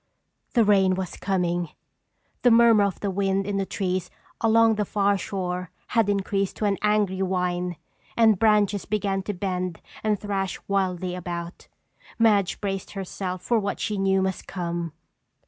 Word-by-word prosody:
The 235 Hz, -, +6 dB
rain 195 Hz, -2 st, +4 dB
was 185 Hz, -1 st, -4 dB
coming! 175 Hz, -3 st, -1 dB, 0.7 s
The 245 Hz, -, +5 dB
murmur 230 Hz, -3 st, +6 dB
of 200 Hz, -, -3 dB
the 200 Hz, -, -1 dB
wind 195 Hz, 0 st, 0 dB
in 200 Hz, 0 st, -2 dB
the 195 Hz, -1 st, -1 dB
trees 185 Hz, -2 st, -2 dB, 0.3 s
along 225 Hz, 0 st, +5 dB
the 210 Hz, -1 st, 0 dB
far 200 Hz, 0 st, +1 dB
shore 180 Hz, -2 st, -3 dB, 0.2 s
had 225 Hz, -4 st, +2 dB
increased 195 Hz, -1 st, 0 dB
to 215 Hz, -, -2 dB
an 200 Hz, -3 st, +1 dB
angry 210 Hz, -3 st, +1 dB
whine 180 Hz, -1 st, -1 dB, 0.4 s
and 220 Hz, -4 st, +5 dB
branches 210 Hz, -2 st, +3 dB
began 195 Hz, -2 st, -1 dB
to 205 Hz, +2 st, -4 dB
bend 180 Hz, -2 st, -3 dB, 0.2 s
and 210 Hz, -2 st, +1 dB
thrash 195 Hz, -2 st, -2 dB
wildly 185 Hz, -2 st, 0 dB
about. 175 Hz, -1 st, -6 dB, 0.5 s
Madge 205 Hz, -5 st, +3 dB
braced 195 Hz, -2 st, -4 dB
herself 185 Hz, -2 st, -5 dB
for 235 Hz, -2 st, +2 dB
what 200 Hz, -1 st, -3 dB
she 210 Hz, -, -1 dB
knew 190 Hz, 0 st, +2 dB
must 190 Hz, -1 st, -3 dB
come. 170 Hz, -3 st, -3 dB
195 Hz, 155 wpm, -25 LUFS, 180-205 Hz, 0.7 s, The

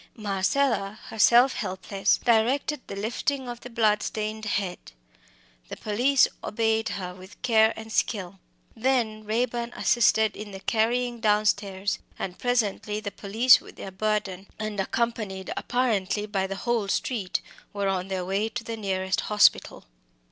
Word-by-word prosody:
Marcella, 205 Hz, +1 st, 0 dB
herself 240 Hz, +4 st, +5 dB
helpless, 190 Hz, +1 st, 0 dB
directed 255 Hz, +5 st, +1 dB
the -, -, -6 dB
lifting 245 Hz, +6 st, -2 dB
of 240 Hz, -1 st, -6 dB
the 245 Hz, -, -10 dB
bloodstained 215 Hz, -1 st, 0 dB
head; 195 Hz, -3 st, -2 dB, 0.9 s
the -, -, -6 dB
police 245 Hz, +6 st, +3 dB, 0.2 s
obeyed 225 Hz, 0 st, 0 dB
her 180 Hz, -2 st, -5 dB
with 185 Hz, +2 st, -14 dB
care 220 Hz, -2 st, +5 dB
and 220 Hz, 0 st, -9 dB
skill. 195 Hz, -3 st, -1 dB, 0.4 s
Then 225 Hz, -3 st, 0 dB
Raeburn 235 Hz, +2 st, -1 dB
assisted 220 Hz, -2 st, +3 dB
in 210 Hz, -1 st, -8 dB
the 195 Hz, -, -7 dB
carrying 240 Hz, +3 st, 0 dB
downstairs, 205 Hz, -2 st, +1 dB, 0.2 s
and 180 Hz, -1 st, -5 dB
presently 215 Hz, -4 st, 0 dB
the 210 Hz, -2 st, -5 dB
police 220 Hz, +6 st, +4 dB
with -, -, -14 dB
their 195 Hz, -, -8 dB
burden, 200 Hz, -1 st, -2 dB
and 215 Hz, -2 st, -4 dB
accompanied 200 Hz, -2 st, -2 dB
apparently 215 Hz, -5 st, 0 dB
by 195 Hz, -2 st, -1 dB
the 195 Hz, -, -4 dB
whole 230 Hz, 0 st, -1 dB
street, 195 Hz, -2 st, -1 dB, 0.3 s
were 200 Hz, -1 st, -2 dB
on 190 Hz, -1 st, -1 dB
their 190 Hz, -2 st, -3 dB
way 200 Hz, +4 st, 0 dB
to 235 Hz, +1 st, -5 dB
the 230 Hz, 0 st, -5 dB
nearest 190 Hz, -2 st, -1 dB
hospital. 210 Hz, -1 st, +3 dB
215 Hz, 140 wpm, -26 LUFS, 195-235 Hz, 0.9 s, herself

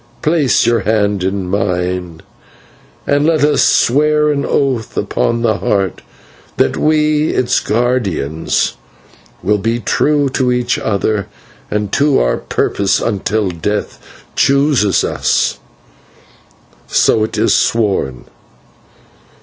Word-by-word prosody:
Place 150 Hz, -4 st, +2 dB
your 120 Hz, -1 st, +2 dB
hand 105 Hz, -3 st, 0 dB
in 95 Hz, 0 st, -2 dB
mine, 90 Hz, -3 st, -2 dB, 0.8 s
and 145 Hz, 0 st, +1 dB
let 155 Hz, -2 st, +2 dB
us 150 Hz, 0 st, +3 dB
swear 150 Hz, +3 st, +3 dB
an 140 Hz, -1 st, -1 dB
oath 130 Hz, -5 st, -1 dB
upon 115 Hz, +3 st, -1 dB
the 110 Hz, -3 st, +1 dB
Heart 100 Hz, -3 st, -1 dB, 0.6 s
that -, -, +1 dB
we, 155 Hz, 0 st, +1 dB
its 125 Hz, 0 st, +1 dB
guardians, 105 Hz, -, -1 dB, 0.7 s
will 105 Hz, +2 st, +1 dB
be 115 Hz, +4 st, -1 dB
true 145 Hz, +6 st, +1 dB
to 130 Hz, -1 st, 0 dB
each 125 Hz, 0 st, 0 dB
other 100 Hz, -1 st, -1 dB, 0.4 s
and 105 Hz, -1 st, -2 dB
to 145 Hz, 0 st, +3 dB
our -, -, +1 dB
purpose 100 Hz, -1 st, 0 dB
until 105 Hz, -1 st, -1 dB
death 105 Hz, +5 st, -3 dB, 0.4 s
chooses 140 Hz, -7 st, +2 dB
us. -, -, 0 dB, 1.3 s
So, 110 Hz, -, +2 dB
it 110 Hz, -, -4 dB
is -, -, +2 dB
sworn. 100 Hz, -, 0 dB
110 Hz, 110 wpm, -15 LUFS, 100-140 Hz, 1.3 s, us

